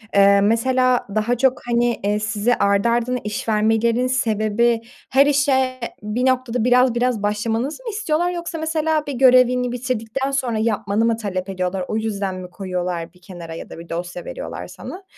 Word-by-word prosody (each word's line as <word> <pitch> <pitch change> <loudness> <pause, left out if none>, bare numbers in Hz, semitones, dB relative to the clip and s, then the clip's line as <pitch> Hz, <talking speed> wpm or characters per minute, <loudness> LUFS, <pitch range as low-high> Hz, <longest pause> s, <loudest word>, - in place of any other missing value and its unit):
Eee, 200 0 +6
mesela 250 +4 +2
daha 225 +3 +1
çok, 260 +1 +2
hani, 240 0 +1
eee, 205 +1 +1
size 215 +2 0
ardı 200 +3 +2
ardına 240 +2 0
iş 210 +2 -4
vermelerinin 225 +3 +2
sebebi 230 -1 +1 0.3
her 275 +2 +5
işe 270 -3 +2 0.2
bir 210 +4 -2
noktada 255 -2 +1
biraz 250 -1 +4
biraz 240 -3 0
başlamanızı 225 - -2
mı 480 - -4
istiyorlar 355 -5 0
yoksa 345 -1 -5
mesela 315 -1 0
bir 285 - -3
görevini 250 -1 +4
bitirdikten 250 +2 -2
sonra 255 -5 -1
yapmanı 215 -1 0
mı 230 -1 +1
talep 195 -3 -4
ediyorlar. 185 0 -2
O 215 - -2
yüzden 200 -4 -2
mi 185 -1 -8
koyuyorlar 180 -3 -4
bir 180 - -23
kenara 175 -3 -9
ya - - -8
da - - -9
bir 170 - -11
dosya 175 - -5
veriyorlar - - -6
sana? 380 - -9
235 Hz, 170 wpm, -21 LUFS, 205-255 Hz, 0.3 s, Eee